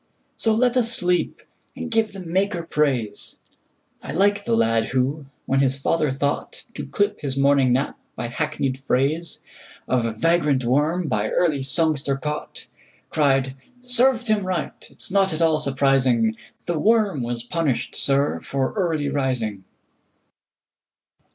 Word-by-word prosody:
So 225 Hz, -1 st, +2 dB
let 245 Hz, +2 st, +2 dB
us 235 Hz, -2 st, +2 dB
sleep, 180 Hz, -5 st, 0 dB, 0.3 s
and 250 Hz, -2 st, -6 dB
give 225 Hz, -1 st, +1 dB
the 195 Hz, -, -9 dB
Maker 180 Hz, +1 st, -1 dB
praise.I 130 Hz, -10 st, -4 dB
like 200 Hz, +4 st, +2 dB
the 115 Hz, -, +2 dB
lad 115 Hz, 0 st, +2 dB
who, 135 Hz, +3 st, -1 dB, 0.2 s
when 135 Hz, -, +1 dB
his 135 Hz, 0 st, +2 dB
father 155 Hz, +2 st, +1 dB
thoughtTo 140 Hz, -, -4 dB
clip 205 Hz, 0 st, 0 dB
his 135 Hz, -2 st, -2 dB
morning 140 Hz, -2 st, +4 dB
nap 130 Hz, +3 st, 0 dB, 0.2 s
by -, -, -4 dB
hackneyed 135 Hz, +1 st, -2 dB
phraseOf 140 Hz, +5 st, -1 dB, 0.8 s
vagrant 150 Hz, -5 st, +2 dB
worm 155 Hz, +7 st, +1 dB
by 110 Hz, -4 st, 0 dB
early 155 Hz, -6 st, +1 dB
songster 140 Hz, -1 st, 0 dB
caught, 150 Hz, +2 st, -5 dB, 0.5 s
Cried, 135 Hz, -3 st, +2 dB, 0.3 s
"Served 250 Hz, 0 st, +3 dB
him 215 Hz, -3 st, +1 dB
right!—it 185 Hz, -4 st, -5 dB
's -, -, -8 dB
not 195 Hz, -2 st, +2 dB
at 155 Hz, -, -3 dB
all 160 Hz, -2 st, +3 dB
surprising; 130 Hz, -5 st, +2 dB, 0.3 s
The 170 Hz, -3 st, -1 dB
worm 210 Hz, -, +2 dB
was 120 Hz, 0 st, -3 dB
punished, 145 Hz, -1 st, -1 dB
sir, 140 Hz, +1 st, +1 dB
for 135 Hz, -1 st, -2 dB
early 165 Hz, -8 st, 0 dB
rising!" 125 Hz, -8 st, -2 dB
150 Hz, 130 wpm, -23 LUFS, 135-180 Hz, 0.8 s, morning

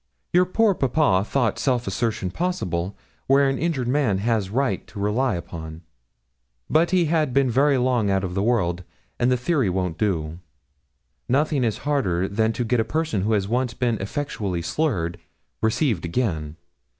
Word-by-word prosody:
Your 180 Hz, +1 st, +5 dB
poor 210 Hz, +3 st, +3 dB
papa 135 Hz, -, +2 dB
thought 115 Hz, -1 st, 0 dB
self 125 Hz, -3 st, +1 dB
assertion 110 Hz, -6 st, -2 dB
possible, 95 Hz, -, -2 dB, 0.3 s
where 140 Hz, +1 st, +5 dB
an 135 Hz, 0 st, -1 dB
injured 155 Hz, -7 st, -1 dB
man 125 Hz, -7 st, +2 dB
has 105 Hz, -1 st, 0 dB
right 130 Hz, +5 st, -1 dB
to 105 Hz, -, -9 dB
rely 105 Hz, +3 st, +1 dB
upon, 80 Hz, -1 st, -7 dB, 0.8 s
but 165 Hz, +2 st, +3 dB
he 180 Hz, -2 st, +3 dB
had 155 Hz, -5 st, 0 dB
been 135 Hz, -3 st, +3 dB
very 140 Hz, +3 st, +3 dB
long 125 Hz, -4 st, +1 dB
out 95 Hz, 0 st, +1 dB
of 90 Hz, -2 st, -3 dB
the 95 Hz, -, 0 dB
world, 90 Hz, -6 st, +1 dB, 0.4 s
and 120 Hz, +1 st, +3 dB
the 125 Hz, -, +3 dB
theory 130 Hz, -, +1 dB
won't 90 Hz, -2 st, -2 dB
do. 85 Hz, -6 st, -1 dB, 0.9 s
Nothing 140 Hz, +1 st, +2 dB
is 115 Hz, -3 st, 0 dB
harder 95 Hz, -12 st, +1 dB
than 110 Hz, +2 st, +1 dB
to 120 Hz, -, -2 dB
get 120 Hz, +1 st, +1 dB
a -, -, +3 dB
person 155 Hz, -, -1 dB
who 110 Hz, +3 st, +1 dB
has 100 Hz, -2 st, +1 dB
once 120 Hz, +1 st, -1 dB
been 120 Hz, -3 st, 0 dB
effectually 100 Hz, -, -3 dB
slurred, 85 Hz, -, -1 dB, 0.4 s
received 110 Hz, -, +1 dB
again. 85 Hz, -6 st, -2 dB
115 Hz, 165 wpm, -23 LUFS, 95-140 Hz, 0.9 s, Your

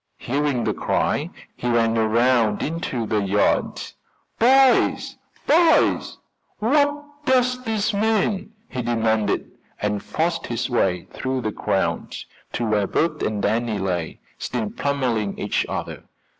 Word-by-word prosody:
Hearing 140 Hz, -1 st, -1 dB
the -, -, 0 dB
cry -, -, 0 dB, 0.3 s
he 125 Hz, -, -3 dB
ran 115 Hz, -1 st, +2 dB
around 115 Hz, -1 st, +2 dB
into 145 Hz, -7 st, -2 dB
the 105 Hz, -1 st, 0 dB
yard. 100 Hz, +1 st, +1 dB, 0.6 s
"Boys! 265 Hz, +2 st, +4 dB, 0.3 s
boys! 325 Hz, +2 st, +3 dB, 0.4 s
what 290 Hz, +5 st, +2 dB, 0.2 s
does 255 Hz, -2 st, +2 dB
this 220 Hz, -1 st, 0 dB
mean?" 210 Hz, -1 st, 0 dB, 0.2 s
he 130 Hz, -, -4 dB
demanded, 110 Hz, -3 st, 0 dB, 0.3 s
and 105 Hz, -1 st, -1 dB
forced 165 Hz, +1 st, -2 dB
his 120 Hz, +2 st, -3 dB
way 90 Hz, -7 st, +1 dB
through 130 Hz, 0 st, -2 dB
the 110 Hz, -2 st, -2 dB
crowd -, -, -1 dB, 0.4 s
to 120 Hz, -, -1 dB
where 105 Hz, -2 st, +1 dB
Bert 155 Hz, -, 0 dB
and 105 Hz, -1 st, -1 dB
Danny 115 Hz, -1 st, 0 dB
lay, 90 Hz, -4 st, -3 dB, 0.2 s
still 110 Hz, -4 st, -3 dB
pummeling 125 Hz, -8 st, -1 dB
each -, -, -1 dB
other. -, -, -5 dB
125 Hz, 125 wpm, -22 LUFS, -, 0.6 s, Boys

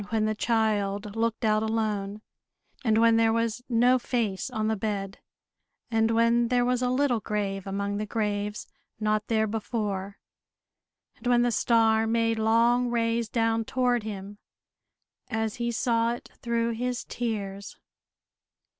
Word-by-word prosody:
when 220 Hz, -2 st, +1 dB
the 215 Hz, -, +1 dB
child 210 Hz, -2 st, 0 dB
looked 225 Hz, 0 st, -1 dB
out 215 Hz, 0 st, +3 dB
alone, 215 Hz, -2 st, -2 dB, 0.6 s
and 220 Hz, -3 st, +3 dB
when 230 Hz, 0 st, +5 dB
there 225 Hz, 0 st, +4 dB
was 230 Hz, +1 st, -1 dB
no 245 Hz, +2 st, +4 dB
face 225 Hz, -6 st, -2 dB
on 215 Hz, -1 st, -2 dB
the 220 Hz, -, +1 dB
bed; 200 Hz, -1 st, -3 dB, 0.7 s
and 225 Hz, 0 st, +2 dB
when 230 Hz, +1 st, +3 dB
there 245 Hz, 0 st, +2 dB
was 250 Hz, 0 st, +1 dB
a 250 Hz, -, +1 dB
little 255 Hz, -2 st, +2 dB
grave 200 Hz, -2 st, -3 dB
among 200 Hz, +1 st, -2 dB
the 210 Hz, -, -2 dB
graves, 210 Hz, -1 st, -2 dB, 0.3 s
not 215 Hz, 0 st, 0 dB
there 220 Hz, -1 st, +2 dB
before; 205 Hz, -2 st, -3 dB, 1.0 s
and -, -, -7 dB
when 240 Hz, -1 st, +4 dB
the 245 Hz, -, +2 dB
star 225 Hz, -1 st, +3 dB
made 225 Hz, 0 st, +1 dB
long 235 Hz, +3 st, +3 dB
rays 230 Hz, -1 st, 0 dB
down 225 Hz, 0 st, +1 dB
toward 245 Hz, 0 st, +1 dB
him, 205 Hz, -1 st, -7 dB, 0.9 s
as 220 Hz, -1 st, -2 dB
he 235 Hz, 0 st, -1 dB
saw 230 Hz, 0 st, +1 dB
it 240 Hz, -, -10 dB
through 235 Hz, 0 st, 0 dB
his 245 Hz, +2 st, -2 dB
tears. 200 Hz, -4 st, -4 dB
225 Hz, 145 wpm, -27 LUFS, 210-235 Hz, 1.0 s, when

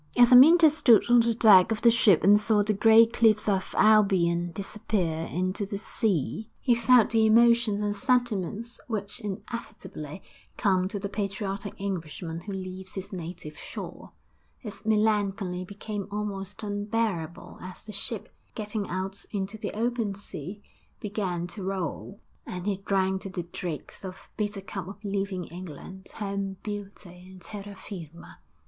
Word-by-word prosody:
As 245 Hz, 0 st, +7 dB
Amyntas 310 Hz, +5 st, +8 dB
stood 240 Hz, -8 st, +5 dB
on 240 Hz, -, +7 dB
the 230 Hz, 0 st, +2 dB
deck 215 Hz, -3 st, +7 dB
of 220 Hz, 0 st, -2 dB
the 235 Hz, -, +7 dB
ship 205 Hz, -8 st, +4 dB
and 205 Hz, +3 st, +7 dB
saw 210 Hz, -1 st, +2 dB
the 215 Hz, +1 st, +1 dB
grey 225 Hz, +2 st, +7 dB
cliffs 225 Hz, -2 st, +3 dB
of 195 Hz, -2 st, 0 dB
Albion 185 Hz, -5 st, +4 dB
disappear 185 Hz, -4 st, -2 dB
into 185 Hz, +3 st, -1 dB
the 200 Hz, 0 st, -4 dB
sea, 210 Hz, -, -1 dB
he 250 Hz, -, +3 dB
felt 235 Hz, -1 st, +4 dB
the 225 Hz, -1 st, +4 dB
emotions 230 Hz, -2 st, +4 dB
and 205 Hz, 0 st, -1 dB
sentiments 235 Hz, -2 st, -1 dB
which 205 Hz, -2 st, -4 dB
inevitably 195 Hz, -, -7 dB, 0.3 s
come 185 Hz, -2 st, +2 dB
to 205 Hz, -, -4 dB
the 200 Hz, -, -3 dB
patriotic 200 Hz, 0 st, -4 dB
Englishman 170 Hz, -3 st, -5 dB
who 205 Hz, -, -7 dB
leaves 185 Hz, 0 st, -6 dB
his 195 Hz, +2 st, -6 dB
native 170 Hz, -3 st, -7 dB
shore; -, -, -9 dB, 0.4 s
his 215 Hz, -2 st, -9 dB
melancholy 205 Hz, -4 st, +1 dB
became 200 Hz, +1 st, -6 dB
almost 205 Hz, -1 st, -5 dB
unbearable 205 Hz, -5 st, -3 dB
as 185 Hz, 0 st, -9 dB
the 215 Hz, -, -9 dB
ship, 210 Hz, +1 st, -5 dB, 0.3 s
getting 210 Hz, -1 st, -4 dB
out 190 Hz, +2 st, -4 dB
into 200 Hz, 0 st, -3 dB
the 220 Hz, -, -5 dB
open 230 Hz, -2 st, -1 dB
sea, 200 Hz, 0 st, -9 dB, 0.4 s
began 195 Hz, -5 st, -3 dB
to 185 Hz, +4 st, -8 dB
roll, 190 Hz, +1 st, -4 dB, 0.3 s
and 180 Hz, 0 st, -6 dB
he 200 Hz, -2 st, 0 dB
drank 190 Hz, -1 st, +1 dB
to 195 Hz, -, -6 dB
the 180 Hz, -2 st, -4 dB
dregs 170 Hz, -3 st, -7 dB
the 185 Hz, -2 st, -7 dB, 0.2 s
bitter 205 Hz, -2 st, -3 dB
cup 195 Hz, -2 st, -6 dB
of 195 Hz, -, -8 dB
leaving 195 Hz, -2 st, -2 dB
England, 180 Hz, +2 st, -10 dB
home, 200 Hz, -2 st, -3 dB
beauty 200 Hz, -3 st, -8 dB
and 185 Hz, -2 st, -14 dB
terra 205 Hz, 0 st, -8 dB
firma. 170 Hz, -5 st, -10 dB
200 Hz, 150 wpm, -27 LUFS, 185-215 Hz, 0.4 s, Amyntas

